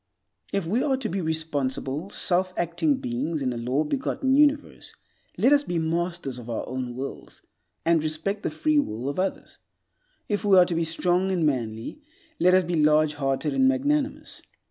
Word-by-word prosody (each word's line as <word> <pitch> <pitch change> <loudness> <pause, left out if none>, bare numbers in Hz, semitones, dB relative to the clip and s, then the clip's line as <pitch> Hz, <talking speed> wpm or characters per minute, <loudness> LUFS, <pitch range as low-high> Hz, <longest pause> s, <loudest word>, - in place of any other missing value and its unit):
If 195 -3 -1
we 215 +9 0
are 270 -2 +1
to 255 -4 -3
be 190 +2 -2
responsible, 155 -1 -2
self 185 -2 0
acting 175 - +1
beings 240 - -2
in 130 -3 -1
a - - -6
law 125 +6 0
begotten 265 - 0
universe, 290 0 +1 0.4
let 275 - +4
us 290 0 +4
be 175 -10 -3
masters 165 -4 -2
of 120 0 -10
our 115 - -3
own 125 -1 -4
wills, 135 +2 -8 0.4
and 165 -1 +3
respect 160 +7 -2
the - - -1
free 310 -1 +1
will 120 - -3
of 145 - -4
others. 190 - -3 0.7
If 205 -1 -1
we 200 -2 +5
are 180 - +8
to 175 - -2
be 165 0 0
strong 180 +3 +1
and 175 -4 +1
manly, 120 - -2 0.4
let 180 +1 +5
us 185 - +4
be 170 -3 0
large 155 0 +4
hearted 140 +1 -1
and 265 0 +4
magnanimous. 280 +2 -1
170 Hz, 180 wpm, -25 LUFS, 145-210 Hz, 0.7 s, are